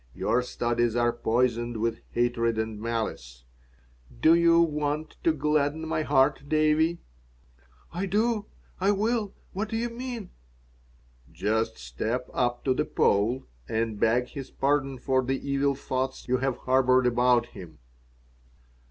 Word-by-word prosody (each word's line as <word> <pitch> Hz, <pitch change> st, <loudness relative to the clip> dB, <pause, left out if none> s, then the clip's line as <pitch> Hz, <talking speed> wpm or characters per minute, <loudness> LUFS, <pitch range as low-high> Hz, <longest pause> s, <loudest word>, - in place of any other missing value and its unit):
Your 125 Hz, -, +1 dB
studies 120 Hz, -1 st, -1 dB
are 120 Hz, 0 st, +2 dB
poisoned 120 Hz, 0 st, 0 dB
with 115 Hz, +1 st, -1 dB
hatred 120 Hz, -1 st, 0 dB
and 110 Hz, -1 st, -3 dB
malice. 110 Hz, -, -4 dB, 0.8 s
Do 160 Hz, +6 st, +6 dB
you 170 Hz, 0 st, +5 dB
want 150 Hz, -1 st, 0 dB
to 165 Hz, -, +4 dB
gladden 150 Hz, +1 st, 0 dB
my 155 Hz, -, 0 dB
heart, 140 Hz, -1 st, +2 dB
Davie?" 155 Hz, +2 st, +2 dB, 0.9 s
"I 185 Hz, +3 st, -2 dB
do. 215 Hz, +2 st, 0 dB, 0.3 s
I 195 Hz, +2 st, +2 dB
will. 215 Hz, 0 st, -1 dB, 0.2 s
What 205 Hz, +3 st, -3 dB
do 225 Hz, -, -2 dB
you 240 Hz, +1 st, -1 dB
mean?" 235 Hz, -5 st, -6 dB, 1.0 s
"Just 110 Hz, -, -1 dB
step 90 Hz, -, -4 dB
up 120 Hz, -1 st, 0 dB
to 130 Hz, -, +3 dB
the 150 Hz, -, 0 dB
Pole 115 Hz, +6 st, +1 dB, 0.3 s
and 110 Hz, -1 st, -1 dB
beg 120 Hz, +3 st, +2 dB
his 135 Hz, -3 st, -7 dB
pardon 135 Hz, -1 st, 0 dB
for 130 Hz, +1 st, +1 dB
the 135 Hz, +2 st, -1 dB
evil 140 Hz, 0 st, +1 dB
thoughts 130 Hz, 0 st, -3 dB
you 130 Hz, +1 st, +2 dB
have 135 Hz, 0 st, -1 dB
harbored 130 Hz, 0 st, +3 dB
about 120 Hz, 0 st, +3 dB
him." 80 Hz, -8 st, -11 dB
130 Hz, 135 wpm, -27 LUFS, 120-155 Hz, 1.0 s, Do